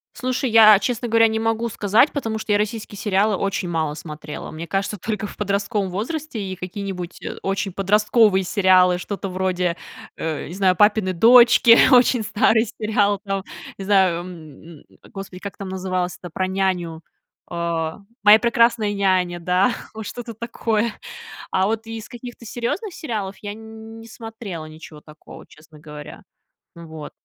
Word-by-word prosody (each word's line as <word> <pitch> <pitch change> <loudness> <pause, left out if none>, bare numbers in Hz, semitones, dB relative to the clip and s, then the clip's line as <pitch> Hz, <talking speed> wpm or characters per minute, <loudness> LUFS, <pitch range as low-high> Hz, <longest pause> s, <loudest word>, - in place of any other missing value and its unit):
Слушай, 255 0 -2
я, 215 -2 +8
честно 240 +1 -2
говоря, 225 0 +4
не 220 0 -1
могу 225 +1 -1
сказать, 215 +6 +3
потому 225 -6 -3
что 215 - -4
я 205 - +4
российские 210 0 -4
сериалы 205 +1 +1
очень 195 -1 -2
мало 160 -3 -1
смотрела. 150 -1 -8
Мне 160 +2 -7
кажется, 195 +4 -2
только 210 +2 -4
в - - -12
подростковом 200 0 -1
возрасте 250 - -4
и 190 -1 -5
какие-нибудь, 180 -1 -6
э, - - -6
очень 195 0 -2
подростковые 205 +1 +3
сериалы, 185 -2 +4
что-то 195 +1 -5
вроде, 180 -2 -1 0.4
э, 160 -2 -4
не 170 - -8
знаю, 190 -1 +2
"Папины 210 -1 +3
дочки", 235 +3 +7
очень 245 -2 +5
старый 220 +1 +2
сериал. 210 -2 0
Там, 195 -2 -3 0.3
не 195 - -7
знаю, 190 -4 +3 0.6
м, - - -21 0.3
Господи, 195 -2 -8
как 200 0 -8
там 195 -1 -6
называлось 185 -1 -3
это 175 - -10
про 185 - -1
няню, 185 -4 -2 0.5
а, 170 -1 -3 0.2
"Моя 210 +1 +8
прекрасная 230 -3 +2
няня", 185 -3 +1
да. 180 +6 +2 0.2
Вот 220 -1 -7
что-то 235 +1 -7
такое. 230 0 -2 0.6
А 190 +1 +2
вот 225 +1 -2
из 225 -2 -7
каких-то 240 0 -10
серьезных 245 - -4
сериалов 210 - -4
я 205 -1 -5
не 220 +1 -11
смотрела 220 -7 -8
ничего 155 -1 -12
такого, 150 0 -14
честно 155 0 -18
говоря. 150 -1 -11 0.5
Вот. 160 -3 -9
200 Hz, 155 wpm, -21 LUFS, 180-225 Hz, 0.6 s, я